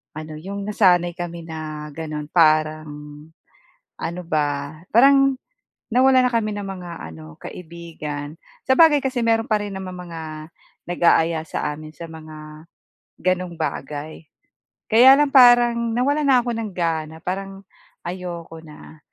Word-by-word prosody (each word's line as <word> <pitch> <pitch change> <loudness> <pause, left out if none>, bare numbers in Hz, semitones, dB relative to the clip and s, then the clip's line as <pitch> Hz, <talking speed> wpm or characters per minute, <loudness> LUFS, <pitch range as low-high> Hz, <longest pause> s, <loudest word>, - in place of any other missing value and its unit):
ano 155 0 -7
iyong 200 +3 -6
nasanay 180 -4 +3
kami 170 -1 -6
na 155 -1 -6
ganoon 155 -2 -5
parang 155 -2 +3 1.1
ano 170 +2 -4
ba? 145 -1 -2 0.2
Parang 275 +2 +6 0.6
nawalan 255 0 +5
na - - -8
kami 215 -2 0
ng 205 - -4
mga 180 -2 -7 0.2
ano, 80 -1 -12
kaibigan. 160 -3 -8 0.3
Sabagay 295 +1 +6
kasi 260 -2 -1
mayroon 225 0 +1
pa 215 - +4
rin 205 -1 -5
namang 185 -1 -7
mga 165 -1 -7 0.7
nag-aaya 170 -2 +2
sa 150 - -2
amin 155 +1 -11
sa 170 - -8
mga, 155 0 -11 0.6
ganung 185 -1 0
bagay. 150 +1 -5 0.7
Kaya 250 +4 +8
lang 295 -1 +3
parang 240 -3 +5
nawalan 285 +4 +1
na 255 -2 +5
ako 240 - -2
ng 220 -3 -4
gana, 160 -2 -2
parang 195 +1 -5 0.4
ayoko 175 -2 -6
na, 155 0 -14
175 Hz, 130 wpm, -22 LUFS, 155-225 Hz, 1.1 s, Kaya